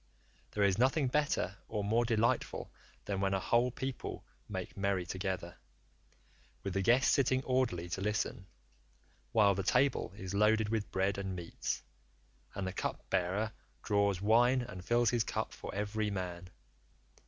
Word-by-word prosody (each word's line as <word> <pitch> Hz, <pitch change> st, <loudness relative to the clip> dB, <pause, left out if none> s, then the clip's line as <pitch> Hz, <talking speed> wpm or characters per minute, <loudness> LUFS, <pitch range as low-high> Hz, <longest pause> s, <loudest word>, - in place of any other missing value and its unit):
There 105 Hz, -, 0 dB
is 100 Hz, 0 st, +3 dB
nothing 130 Hz, +2 st, +3 dB
better 140 Hz, -9 st, 0 dB
or 105 Hz, -2 st, -2 dB
more 115 Hz, +4 st, +2 dB
delightful 115 Hz, 0 st, 0 dB, 0.3 s
than 100 Hz, -1 st, -2 dB
when 95 Hz, 0 st, +2 dB
a -, -, +1 dB
whole 120 Hz, +5 st, +3 dB
people 130 Hz, +1 st, -5 dB, 0.2 s
make -, -, -5 dB
merry 100 Hz, -2 st, 0 dB
together, 95 Hz, -1 st, -4 dB, 1.1 s
with 100 Hz, -, -3 dB
the 100 Hz, -, +1 dB
guests 120 Hz, +7 st, +4 dB
sitting 130 Hz, -1 st, +2 dB
orderly 125 Hz, -11 st, 0 dB
to 95 Hz, -, -3 dB
listen, 100 Hz, -2 st, -1 dB, 0.8 s
while 100 Hz, -2 st, +5 dB
the 100 Hz, -, -1 dB
table 125 Hz, +7 st, +2 dB
is 95 Hz, -1 st, -5 dB
loaded 105 Hz, +1 st, +3 dB
with 110 Hz, -2 st, -1 dB
bread 95 Hz, +1 st, 0 dB
and 95 Hz, -1 st, -3 dB
meats, 85 Hz, -2 st, -4 dB, 0.7 s
and 100 Hz, -, -2 dB
the 95 Hz, -, -3 dB
cup -, -, -4 dB
bearer 95 Hz, +5 st, +1 dB, 0.3 s
draws 100 Hz, -3 st, +2 dB
wine 120 Hz, +5 st, +4 dB
and 95 Hz, -7 st, -8 dB
fills 120 Hz, +3 st, +3 dB
his 120 Hz, -2 st, +2 dB
cup -, -, -3 dB
for -, -, -7 dB
every 105 Hz, +1 st, -1 dB
man. 90 Hz, -2 st, -4 dB
105 Hz, 155 wpm, -33 LUFS, 95-120 Hz, 1.1 s, while